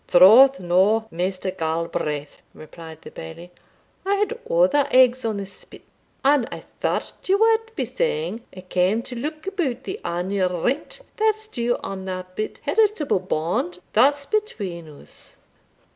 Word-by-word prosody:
"Troth 230 +10 +7
no, 190 +5 +2
Maister 185 +2 -2
Galbraith," 160 -4 -3
replied 160 0 -12
the - - -10
Bailie, 125 - -10 0.5
"I 395 +1 +1
had 420 +4 -1
other - - +3
eggs 255 0 +5
on 220 -2 -1
the 200 - -4
spit 195 - -14 0.4
and 275 -3 +3
I - - -7 0.2
thought - - -1
ye 380 - +3
wad 450 +1 +2
be - - -1
saying 475 - -2 0.2
I - - -7
cam 185 +5 +1
to 245 - -8
look 305 +6 -5
about 355 - -2
the 390 +3 -5
annual 180 0 -1
rent 275 - -2 0.2
that's 435 0 +1
due 240 - -1
on 190 -1 -5
the 185 -1 -4
bit 215 +3 -5
heritable 415 - +2
band 175 0 -2 0.2
that's 280 +5 +4
between 200 - -3
us." 145 - -15
225 Hz, 145 wpm, -23 LUFS, -, 0.5 s, Troth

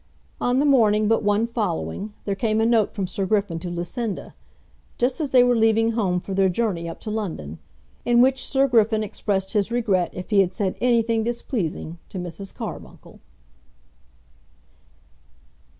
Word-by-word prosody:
On 245 +1 +2
the 285 - +3
morning 215 -6 +4
but 225 +1 +2
one 205 +1 +2
following, 210 - -3
there 200 - 0
came 215 +2 0
a 225 - +3
note 225 -2 +3
from 195 -2 -3
Sir 190 +1 -3
Griffin 200 -5 0
to 175 +1 -6
Lucinda, 185 +5 -4 0.6
just 250 +5 0
as 295 - -1
they 255 -2 +6
were 245 0 +3
leaving 225 0 +3
home 195 -6 0
for 195 - -6
their 190 0 +3
journey 180 -4 -1
up 165 - -8
to 215 - -5
London, 160 - -4 0.4
in 240 0 +3
which 260 +1 +4
Sir 275 0 +2
Griffin 220 -3 +3
expressed 195 -1 -2
his 205 -2 +1
regret 210 -7 +1
if 185 +4 -8
he 205 - +4
had 185 -1 -1
said 195 -3 -1
anything 230 -2 +2
displeasing 205 - -3
to - - -7
Mrs. 180 +2 -5
Carbuncle. - - -9
215 Hz, 165 wpm, -23 LUFS, 185-235 Hz, 0.6 s, they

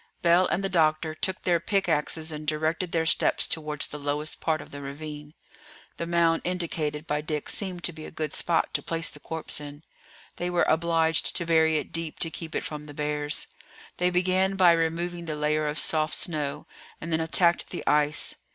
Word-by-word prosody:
Bell 175 +2 +5
and 195 - -1
the - - +1
doctor 155 -3 +2
took 185 +4 -3
their 175 -2 +3
pickaxes 165 -5 0
and 150 0 -7
directed 160 +3 0
their 165 -1 +1
steps - - +3
towards 150 -2 -1
the 150 - -7
lowest 145 +2 -3
part 160 -1 +1
of - - -11
the 145 - -7
ravine; 150 +1 -8 0.6
the 170 - -3
mound 170 -1 +3
indicated 160 -4 -2
by 150 -2 -1
Dick 150 -1 -3
seemed 185 -4 -3
to 175 - +1
be 155 0 -9
a - - -7
good 155 -2 -4
spot 170 -1 +1
to - - +1
place 165 -1 0
the 150 - -9
corpse 160 0 -4
in; 145 +1 -9 0.5
they 175 - -2
were 175 -1 +2
obliged 165 0 +2
to 170 - -1
bury 160 -1 +4
it 150 - -4
deep 165 -2 -3
to 165 - +1
keep 160 -1 -7
it - - -1
from 150 -1 -6
the 145 - -10
bears. 150 0 -1 0.5
They 180 0 +2
began 185 +2 +2
by 180 -3 +6
removing 170 +1 -1
the 155 -2 -3
layer 150 0 0
of 150 +1 -2
soft 155 0 +4
snow, 150 -4 -2 0.3
and 165 +1 -4
then 160 - +2
attacked 170 +1 +3
the - - -6
ice. 150 0 +2
160 Hz, 195 wpm, -27 LUFS, 150-170 Hz, 0.6 s, by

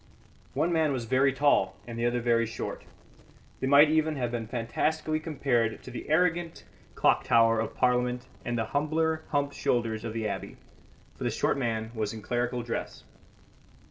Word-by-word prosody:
One 160 +5 +1
man 160 -2 +2
was 120 -3 -3
very 130 +3 +3
tall 130 -9 +2
and 120 0 -7
the 120 +1 0
other 120 0 0
very 115 -1 +2
short; 115 - -6 0.7
they 130 - -1
might 145 +2 +7
even 155 0 +2
have 120 -4 -2
been 115 -2 -3
fantastically 155 +7 -1
compared 135 -8 0
to 130 - -9
the 120 - -7
arrogant 170 +1 +1 0.3
clock - - +3
tower 115 -1 +4
of 110 - -3
Parliament 125 0 +1 0.2
and 120 0 -2
the 115 - 0
humbler 160 +4 0
humped 145 -1 0
shoulders 115 -3 -1
of 115 -2 -4
the 110 -1 -2
Abbey, 100 - -5 0.6
for - - -7
the - - +1
short - - 0
man 115 -4 -2
was 110 -2 -2
in 110 -2 -8
clerical 120 +1 -1
dress. 115 - -5
125 Hz, 175 wpm, -28 LUFS, 115-150 Hz, 0.7 s, might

